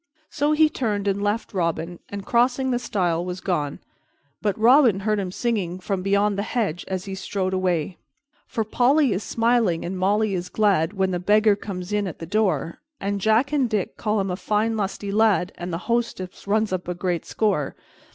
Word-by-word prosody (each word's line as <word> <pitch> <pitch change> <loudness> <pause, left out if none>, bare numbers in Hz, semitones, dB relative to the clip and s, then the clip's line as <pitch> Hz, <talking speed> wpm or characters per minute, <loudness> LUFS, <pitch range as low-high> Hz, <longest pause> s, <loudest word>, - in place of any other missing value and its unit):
So 295 +1 +1
he 310 0 +5
turned 210 -9 -2
and 200 0 0
left 210 +3 -1
Robin 170 -1 -2
and, 200 -1 -6
crossing 250 +2 +2
the 245 - +1
stile, 175 -7 0
was 180 0 -5
gone, 155 -7 -2 0.6
but 205 -2 0
Robin 235 -3 +5
heard 215 +1 +1
him 185 -2 -3
singing 195 -5 -1
from 190 0 -2
beyond 200 +1 +1
the - - +2
hedge 205 -6 -2
as 185 -1 -3
he 195 - -5
strode 190 0 -2
away: 180 -2 -1 0.5
"_For 225 -4 -1
Polly 260 +2 +3
is 190 - -2
smiling 230 -7 +1
and 180 +2 -3
Molly 200 +3 +1
is 180 -1 -3
glad 195 -5 +2
When 190 -2 0
the 180 - -1
beggar 210 +3 +4
comes 195 -1 -6
in 205 -1 +1
at 175 - -6
the 165 - -7
door, 175 -5 0 0.2
And 200 0 -2
Jack 225 +8 +2
and 270 -5 +2
Dick 210 -4 -1
call 210 -1 0
him 195 -1 -1
a - - -1
fine 215 +4 0
lusty 200 -1 -3
lad, 205 -4 +3
And 175 +1 -6
the 165 - -2
hostess 230 -6 -2
runs 215 0 +1
up 180 -1 -3
a 180 - -2
great 175 -2 -1
score. 195 -10 -1
200 Hz, 195 wpm, -23 LUFS, 180-220 Hz, 0.6 s, he